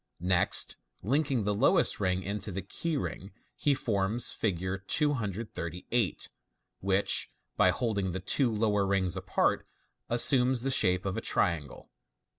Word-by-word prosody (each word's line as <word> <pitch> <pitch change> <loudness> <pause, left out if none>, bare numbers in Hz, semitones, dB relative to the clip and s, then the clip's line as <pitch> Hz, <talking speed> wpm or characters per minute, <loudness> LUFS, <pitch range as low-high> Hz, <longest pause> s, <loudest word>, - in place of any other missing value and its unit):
Next 90 0 +2 0.3
linking 135 - 0
the 105 +1 0
lowest 100 - +3
ring 95 -2 0
into 100 +2 -4
the 95 +1 -5
key 165 -3 -3
ring, 95 -7 -6 0.2
he 145 -1 +1
forms 115 -2 +1
Fig. 95 -5 -2 0.2
238, 110 - -1 0.5
which, 95 +1 +2 0.3
by - - +4
holding 100 -6 -1
the 95 - -4
two 120 +7 +1
lower 105 -2 +1
rings 95 -2 +1
apart, - - 0 0.4
assumes 125 +1 +4
the 135 - 0
shape 90 -7 +2
of 95 +2 -3
a - - -2
triangle. 80 -10 -2
105 Hz, 130 wpm, -29 LUFS, 95-120 Hz, 0.5 s, by